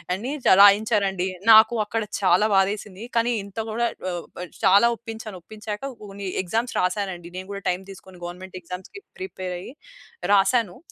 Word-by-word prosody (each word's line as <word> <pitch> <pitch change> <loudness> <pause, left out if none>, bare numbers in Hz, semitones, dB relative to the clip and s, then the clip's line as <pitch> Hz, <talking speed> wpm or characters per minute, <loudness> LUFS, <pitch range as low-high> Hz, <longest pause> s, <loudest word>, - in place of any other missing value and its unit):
అని 240 +8 -5
చ - - +7
రాయించారండి. 200 -2 +4 0.2
నాకు 220 +2 +8
అక్కడ 225 +2 -2 0.2
చాలా 185 +3 +4
బాధేసింది. 200 +2 0
కానీ 235 +1 +2
ఇంత 200 +2 -14
గూడా 235 +2 0 0.2
ఒ - - -2 0.3
ఆహ్, 180 - -9 0.2
చాలా 200 +5 +6
ఒప్పించాను. 220 -4 -8
ఒప్పించాక 210 +1 -7 0.2
కొన్ని 200 -1 -7 0.2
ఎగ్జామ్స్ 225 +7 -2
రాసానండి. 180 -2 -2
నేను 185 +1 -7
కూడా 200 - -7
టైమ్ 180 +2 -2
తీసుకొని 190 -1 -14
గవర్నమెంట్ 185 +1 -8
ఎగ్జామ్స్‌కి 180 - -9 0.2
ప్రిపేర్ 185 - -5
అయ్యి 240 - -10 0.6
రాసాను. 200 -1 +2
200 Hz, 150 wpm, -24 LUFS, 185-220 Hz, 0.6 s, నాకు